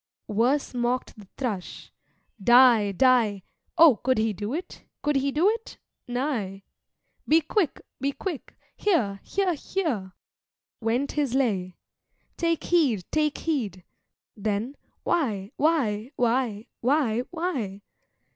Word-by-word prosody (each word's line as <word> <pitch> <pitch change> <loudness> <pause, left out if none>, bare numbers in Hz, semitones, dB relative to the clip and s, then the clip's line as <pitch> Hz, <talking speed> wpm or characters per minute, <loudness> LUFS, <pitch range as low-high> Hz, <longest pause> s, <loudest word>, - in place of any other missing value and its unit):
Worse 245 +8 +1
mock'd 245 +1 -1
the 210 -3 -14
Thrush, 215 -9 -4 0.5
'Die! 240 -3 +6
die! 225 -4 +3 0.3
Oh, 315 -8 +8
could 255 -1 +1
he 220 0 +1
do 205 +3 -5
it? 350 +6 -6 0.2
could 295 0 +1
he 275 +1 0
do 315 +7 +3
it? 450 +2 -2 0.3
Nay! 240 -7 -2 0.6
Be 320 +2 +5
quick! 320 0 0 0.2
be 280 +1 0
quick! 330 0 -6 0.2
Here, 225 - +1
here, 390 -3 0
here!' 270 - -3 0.7
(went 240 +5 0
his 285 -4 -1
lay.) 195 -9 0 0.6
'Take 335 -1 0
heed! 270 - +2
take 305 -1 +1
heed!' 220 - -2 0.5
then 215 +5 -2 0.3
'Why? 215 - 0
why? 255 -8 +1
why? 235 -3 0
why? 250 -3 +2
why? 260 - -3
250 Hz, 120 wpm, -26 LUFS, 210-300 Hz, 0.7 s, Oh